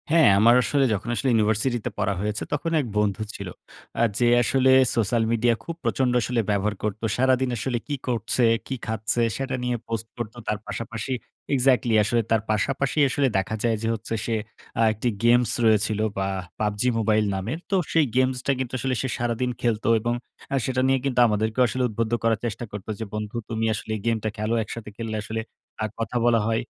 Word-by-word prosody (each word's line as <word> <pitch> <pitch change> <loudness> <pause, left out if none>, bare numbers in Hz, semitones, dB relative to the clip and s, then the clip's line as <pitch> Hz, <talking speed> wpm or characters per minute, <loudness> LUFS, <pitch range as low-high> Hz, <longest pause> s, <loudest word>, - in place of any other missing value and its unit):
হ্যাঁ, 160 -5 +6
আমার 115 +3 +6
আসলে 140 +2 +2
যখন 105 +3 -3
আসলে 135 +2 0
ইউনিভার্সিটিতে 110 +2 +1
পড়া 100 -1 +1
হয়েছে 105 +1 -2
তখন 155 +3 -1
এক - - -5
বন্ধু 105 0 +1
ছিল। 100 - -6 0.5
আ - - +5 0.2
যে 120 - +4
আসলে 130 +2 +3 0.2
সোশ্যাল 115 0 +2
মিডিয়া 115 +1 +3
খুব 165 - -5
প্রচন্ড 130 -2 +1
আসলে 120 +1 -1
ব্যবহার 105 +1 +1
করত 105 0 -2 0.2
সারাদিন 130 0 +3
আসলে 120 +2 -1
কী 145 - -1
করছে? 120 0 0 0.2
কী 135 - -2
খাচ্ছে? 110 +2 -1 0.2
সেটা 135 -1 -2
নিয়ে 125 0 0
পোস্ট 115 0 -3
করত। 115 -2 -5
তার 105 - 0
পাশাপাশি 115 +2 -4 0.4
এক্সাক্টলি 125 -3 +3
আসলে 115 +3 +1
তার 110 -1 +4
পাশাপাশি 135 +6 0
আসলে 135 +2 +2
দেখা 95 +3 -1
যায় 115 -1 +2
যে - - 0
হচ্ছে 115 +1 -6
সে 115 - 0 0.4
আ - - +4
একটি 110 +3 -1
গেমস 120 -1 +4
রয়েছিল 110 -1 +3 0.2
বা 95 0 0 0.3
PUBG 105 -1 -1 0.2
Mobile 110 -1 +2
নামের। 110 - -3
তো - - +3 0.2
সেই 160 -2 +4
গেমসটা 130 +1 +1
কিন্তু 130 -2 -3
আসলে 130 +1 -1
সে 135 - -1
সারাদিন 120 +1 -1
খেলত 115 -3 0 0.2
এবং 120 +2 -1 0.4
আ - - +3
সেটা 130 -1 0
নিয়ে 135 0 +3
কিন্তু 130 -3 +1
আমাদেরকে 110 +2 -1
আসলে 130 +2 -1
উদ্বুদ্ধ 110 +1 -2
করার 115 -2 +2
চেষ্টা 115 +1 -3
করত 100 -2 -7
যে, 110 - -3
বন্ধু 105 +1 -4
তুমি 115 -1 -1
আসলে 110 - -5
গেমটা 110 -2 0
খেলো 110 +2 -1
একসাথে 110 0 -7
খেললে 110 -2 -3
আসলে 110 +1 -3 0.4
আ - - +2
কথা 115 +2 -2
বলা 120 -1 +4
হয়। 115 0 +1
115 Hz, 190 wpm, -24 LUFS, 110-125 Hz, 0.5 s, হ্যাঁ